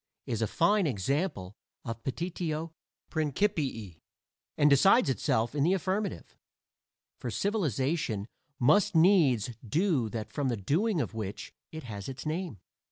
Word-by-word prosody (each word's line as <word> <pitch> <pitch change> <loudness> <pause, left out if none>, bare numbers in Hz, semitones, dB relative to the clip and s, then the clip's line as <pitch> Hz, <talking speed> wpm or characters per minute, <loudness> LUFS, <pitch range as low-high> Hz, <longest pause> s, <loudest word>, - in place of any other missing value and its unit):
is - - -2
a - - +2
fine 205 -4 +2
example 120 - -2 0.3
of 115 0 -5
petitio 165 +1 -3 0.4
principii, 145 - -1 0.6
and 145 - +5
decides 150 - +5
itself 115 -2 0
in 145 -2 +1
the 180 +5 +3
affirmative; 195 +3 -3 0.8
for - - -4
civilization 150 - -1 0.3
must 165 +10 +3
needs 160 - +4
do 145 - +1
that 110 0 -5
from 145 -2 -1
the 120 -3 0
doing 170 - +1
of - - -2
which 105 -3 -6 0.2
it 160 -1 -7
has 105 -4 -6
its 135 +2 -7
name. 160 - -3
150 Hz, 130 wpm, -29 LUFS, 115-180 Hz, 0.8 s, and